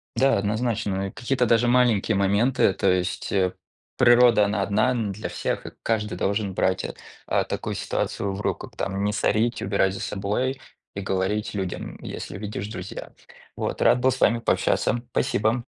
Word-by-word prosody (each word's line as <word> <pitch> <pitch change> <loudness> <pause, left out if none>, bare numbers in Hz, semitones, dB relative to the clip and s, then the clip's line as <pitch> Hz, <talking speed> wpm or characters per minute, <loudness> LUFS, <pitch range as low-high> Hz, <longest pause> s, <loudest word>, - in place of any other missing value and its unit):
Да, 135 0 +3
однозначно, 105 -2 -1
и 95 - -7
какие-то 125 0 0
даже 115 +1 +3
маленькие 120 -4 +3
моменты, 100 +2 +3
то 100 - +1
есть, 90 0 -1
э, 95 -2 +1 0.4
природа, 120 -3 +6
она 100 0 -1
одна 110 +6 +2
н 115 -5 -1
для 105 +3 -5
всех, - - -3
и - - -7
каждый 105 -2 -1
должен 100 -1 -1
брать 95 +1 +1
а - - -5 0.3
а - - +2
такую - - -4
ситуацию 100 -1 -2
в 95 - -5
руку, - - -3
там 100 0 -2
не 105 0 0
сорить, 115 +4 +1
убирать 95 -1 +1
за - - -6
собой 105 +7 -2 0.4
и 100 - -3
говорить 95 +2 -1
людям, 95 -3 -4
если 90 - -6
видишь, 105 -1 -5
друзья. 95 -3 -7 0.4
Вот. - - -3
Рад 125 - +5
был 130 +1 +3
с - - -4
вами 115 +2 +3
пообщаться, 120 +1 +1
спасибо! 120 -2 +1
105 Hz, 170 wpm, -24 LUFS, 100-120 Hz, 0.4 s, природа